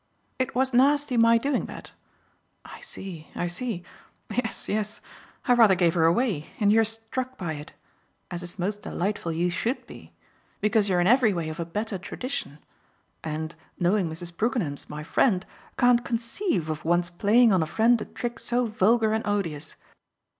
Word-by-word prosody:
"It 260 -2 -1
was 260 +1 +1
nasty 280 +1 +3
my 230 0 +6
doing 275 +3 -1
that? - - -10 0.7
I - - -10
see, 170 -5 -8
I - - -1
see. 180 +1 -3 0.5
Yes, 245 -2 -2
yes: 215 +1 -2 0.5
I 250 - +5
rather 225 -5 +6
gave 175 -2 +3
her 165 -2 +3
away, 170 - +1
and 205 -1 +4
you're 225 0 +5
struck 225 +4 -2
by 170 -5 -3
it 150 0 -9 0.6
as 175 0 -4
is 175 +1 -9
most 200 +3 -2
delightful 185 -2 -2
you 175 +2 0
SHOULD 230 +9 -2
be - - -13 0.5
because 210 0 +2
you're 180 -2 +3
in - - +2
every 230 0 +5
way 165 -3 -2
of 155 +2 -7
a 170 - -2
better 205 +3 -3
tradition 250 - -5 0.7
and, 160 +1 -4 0.3
knowing 180 0 +2
Mrs. 170 +2 -7
Brookenham's 205 - -1
my 150 0 -6
friend, 185 - +2 0.3
can't 245 -1 +4
conceive 230 - -1
of 155 - -5
one's 175 +2 +1
playing 215 +5 +4
on 185 - +3
a 160 - 0
friend 225 +7 +3
a - - -4
trick 240 -1 -5
so 245 +1 0
vulgar 220 +1 +2
and 220 - 0
odious. 165 -7 -2
205 Hz, 170 wpm, -26 LUFS, 175-235 Hz, 0.7 s, my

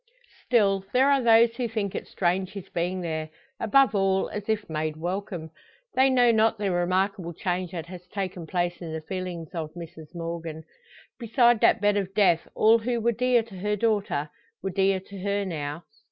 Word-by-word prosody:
Still, 200 -5 +3
there 265 +3 +5
are 275 -1 +3
those 230 0 +5
who 245 -2 -1
think 210 -4 -3
it - - -5
strange 185 +1 -1
his 200 -3 -8
being 180 +2 -2
there 160 -2 -3 0.3
above 230 +1 +4
all, 195 -1 +1
as 210 0 -6
if 215 -1 0
made 155 -1 -3
welcome. 175 -1 -4 0.4
They 265 +1 +4
know 245 -2 +5
not 220 0 +3
the 205 -2 -1
remarkable 185 0 0
change 180 +1 -2
that 165 -3 -4
has 180 0 -11
taken 185 -3 -5
place 175 0 -1
in 165 -2 -6
the 160 - -4
feelings 180 -1 -5
of 160 -2 -5
Mrs 165 -2 -10
Morgan. 165 -1 -5 0.6
Beside 240 0 +3
that - - +4
bed 205 0 +3
of 195 -1 -3
death 185 -6 +3
all 225 +2 +5
who 240 +1 -1
were 235 +1 +2
dear 245 +1 +2
to 215 -4 -12
her 210 +2 0
daughter, 205 -9 0 0.3
were 195 - -2
dear 195 +1 +2
to 195 +1 -11
her 200 +1 -1
now. 155 -2 -4
190 Hz, 185 wpm, -26 LUFS, 170-220 Hz, 0.6 s, there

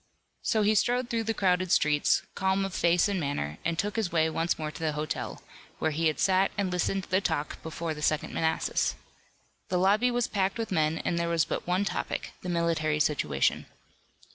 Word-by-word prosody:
So 220 -3 +1
he 210 +1 +4
strode 245 +3 +1
through 230 -1 0
the 225 - 0
crowded 185 -2 +1
streets, 150 -4 +3
calm 190 0 +1
of 195 - -5
face 170 +1 +3
and 200 -2 -1
manner, 110 - -3
and 170 -1 -1
took 205 +3 -1
his 215 -6 0
way 160 -1 +2
once 165 +2 0
more 155 -1 -4
to - - -10
the 160 -2 -1
hotel, 150 0 -4 0.3
where 160 - 0
he 160 +2 +1
had 155 - -1
sat 190 0 +3
and 195 -2 0
listened 185 +2 0
to - - -14
the 185 +1 +3
talk 155 -5 -2
before 160 0 -4
the 150 - -8
Second 155 0 0
Manassas. 160 0 0 0.7
The 180 - +1
lobby 205 +7 +3
was 245 -1 +1
packed 195 0 0
with 225 -2 -3
men, 155 -2 +1
and 170 - 0
there 170 0 0
was 165 -2 +2
but - - -4
one 185 +3 +1
topic, - - -3
the 180 - -5
military 165 -3 +1
situation. 75 - +1
175 Hz, 205 wpm, -28 LUFS, 155-195 Hz, 0.7 s, he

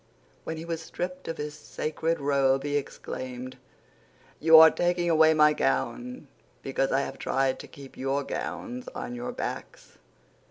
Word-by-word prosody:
When 160 - -4
he 160 - -7
was 165 -1 -3
stripped 180 +1 -5
of 165 - -4
his 150 0 -4
sacred 155 +2 -3
robe 135 -1 +2
he 145 0 -1
exclaimed, 130 -2 -5 0.8
"You 160 +1 +8
are 160 0 +10
taking 175 -1 +1
away 160 0 +5
my 150 0 +6
gown 250 - -2 0.4
because - - 0
I - - +3
have - - -6
tried 135 -1 0
to - - -9
keep 140 -2 -13
your 135 +2 -1
gowns 250 - -5
on 245 - -5
your 245 0 -4
backs." 245 - -7
160 Hz, 155 wpm, -27 LUFS, 140-175 Hz, 0.8 s, are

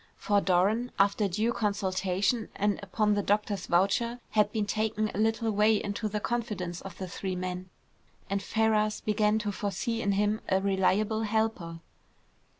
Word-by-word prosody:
For 205 -2 +2
Doran, 200 +7 +2
after 200 +1 +3
due 215 +6 0
consultation, 200 +1 0
and 205 0 0
upon 210 +1 +1
the 205 - +1
doctor's 205 -1 0
voucher, 230 +7 +1
had 210 -1 +3
been 215 -2 -1
taken 215 0 -1
a - - -4
little 225 +1 +1
way 210 +1 +4
into 205 +1 -2
the 210 +1 -2
confidence 210 -7 -3
of 190 -2 -9
the 190 - -5
three 185 +1 -4
men, 185 0 -4 0.6
and 200 0 -1
Ferrars 215 0 +1
began 210 0 +2
to 210 -1 -2
foresee 205 +4 -2
in 200 -2 +1
him 210 +2 +1
a 190 0 +3
reliable 200 +3 +1
helper. 215 -7 -1
205 Hz, 155 wpm, -29 LUFS, 195-220 Hz, 0.6 s, way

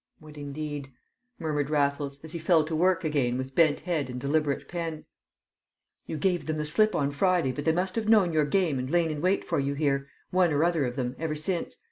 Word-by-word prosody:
"What, 155 -1 -14
indeed!" 145 -1 -6 0.5
murmured 150 -3 -2
Raffles, 140 -1 0
as 160 - -9
he 170 - -5
fell 165 -1 +4
to 160 +1 -3
work 180 +2 +2
again 140 -6 0
with 130 +1 -5
bent 155 -1 +3
head 155 -6 -2
and 125 0 -5
deliberate 145 +1 0
pen. 165 -3 -5 1.0
"You 160 - -4
gave 175 +2 0
them 155 0 -1
the 150 - -2
slip 215 +8 +3
on 140 -2 +1
Friday, 175 -2 +2
but 145 +3 -5
they 160 - +4
must 185 +3 -1
have 220 -1 -1
known 200 -7 +5
your 155 -1 +3
game 160 -4 +1
and 130 +1 -3
lain 170 0 +2
in 150 -1 -4
wait 185 +3 +2
for - - 0
you 140 +1 -1
here, 140 -2 0 0.2
one 180 -2 +3
or 145 +2 +2
other 170 -4 +2
of 120 -1 -3
them, 125 -1 -2
ever 160 -1 -2
since. 170 +3 -3
155 Hz, 220 wpm, -27 LUFS, 140-170 Hz, 1.0 s, known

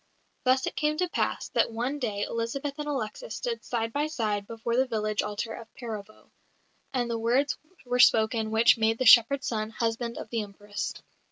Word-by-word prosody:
Thus 260 +1 +3
it - - -4
came 300 0 0
to 360 +2 +1
pass - - -1
that - - +2
one 245 +6 -2
day 210 -6 -2
Elizabeth 235 +6 -3
and 295 - -3
Alexis 275 - -4
stood 475 -2 -3
side 225 -1 -2
by 295 +1 +1
side 210 -8 -2
before 230 +1 -3
the 260 +1 +3
village 215 -3 0
altar 210 +2 -4
of 225 - -10
Perovo; 215 -3 -8 0.6
and 250 -3 0
the 230 -1 -2
words 250 +5 +2 0.3
were 245 0 -1
spoken 220 -1 +4
which 225 +1 +5
made 225 0 +2
the 255 - -1
shepherd's 250 +4 +7
son 215 -2 -2
husband 230 +1 -2
of - - -7
the 230 -2 0
Empress. 205 0 -5
230 Hz, 185 wpm, -28 LUFS, 220-260 Hz, 0.6 s, shepherd's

